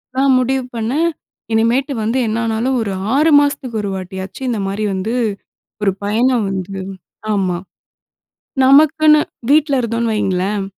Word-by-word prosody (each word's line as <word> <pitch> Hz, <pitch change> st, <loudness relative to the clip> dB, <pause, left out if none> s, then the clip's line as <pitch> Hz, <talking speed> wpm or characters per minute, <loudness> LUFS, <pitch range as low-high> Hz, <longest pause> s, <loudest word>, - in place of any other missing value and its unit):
நான் 265 Hz, 0 st, +3 dB
முடிவு 260 Hz, +1 st, 0 dB
பண்ணே 230 Hz, +6 st, -1 dB, 0.5 s
இனிமேட்டு 240 Hz, +6 st, +1 dB
வந்து 225 Hz, +4 st, 0 dB
என்னானாலும் 230 Hz, +3 st, -1 dB
ஒரு 210 Hz, -3 st, -2 dB, 0.2 s
6 310 Hz, +3 st, +4 dB
மாசத்துக்கு 275 Hz, -5 st, -1 dB
ஒரு 200 Hz, -, -3 dB
வாட்டியாச்சி 190 Hz, +4 st, -7 dB
இந்த 230 Hz, -3 st, -1 dB
மாரி 200 Hz, +2 st, -3 dB
வந்து 190 Hz, +5 st, -2 dB, 0.7 s
ஒரு 195 Hz, -, +3 dB
பயணம் 230 Hz, +2 st, +1 dB
வந்து 190 Hz, 0 st, -4 dB, 0.5 s
ஆமா, 185 Hz, -3 st, 0 dB, 1.1 s
நமக்குன்னு 305 Hz, +3 st, +5 dB, 0.3 s
வீட்ல 290 Hz, -2 st, +3 dB
இருந்தோம்னு 230 Hz, 0 st, -1 dB
வையுங்களேன், 195 Hz, 0 st, -1 dB
230 Hz, 125 wpm, -17 LUFS, 200-265 Hz, 1.1 s, நமக்குன்னு